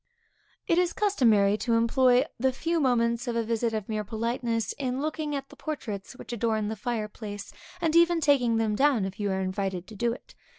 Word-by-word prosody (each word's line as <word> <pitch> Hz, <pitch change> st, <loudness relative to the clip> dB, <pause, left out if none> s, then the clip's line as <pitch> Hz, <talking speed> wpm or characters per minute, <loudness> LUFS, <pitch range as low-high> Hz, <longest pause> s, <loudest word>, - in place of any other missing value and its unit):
It 335 Hz, -, +3 dB
is 360 Hz, -1 st, +1 dB
customary 225 Hz, -, +3 dB
to 230 Hz, +1 st, 0 dB
employ 250 Hz, +3 st, +4 dB
the 265 Hz, +2 st, +2 dB
few 330 Hz, +6 st, -1 dB
moments 235 Hz, -3 st, +1 dB
of 240 Hz, -, -1 dB
a 230 Hz, -, +1 dB
visit 230 Hz, +1 st, 0 dB
of 215 Hz, -3 st, -3 dB
mere 215 Hz, -1 st, -2 dB
politeness, 230 Hz, +1 st, -2 dB
in 260 Hz, -1 st, -1 dB
looking 305 Hz, 0 st, -2 dB
at 275 Hz, -1 st, -5 dB
the -, -, -14 dB
portraits 220 Hz, -11 st, -5 dB
which 245 Hz, -, -8 dB
adorn 220 Hz, -2 st, 0 dB
the 220 Hz, -, -3 dB
fireplace, 210 Hz, -3 st, -5 dB, 0.3 s
and 330 Hz, -2 st, 0 dB
even 340 Hz, 0 st, +5 dB
taking 265 Hz, -7 st, +3 dB
them 220 Hz, -1 st, +1 dB
down, 270 Hz, -5 st, +3 dB
if 190 Hz, +1 st, -7 dB
you 205 Hz, -1 st, 0 dB
are 190 Hz, 0 st, -1 dB
invited 185 Hz, -1 st, -2 dB
to 215 Hz, -, -12 dB
do 235 Hz, +3 st, 0 dB
it. 240 Hz, -, -9 dB
235 Hz, 200 wpm, -27 LUFS, 215-270 Hz, 0.3 s, even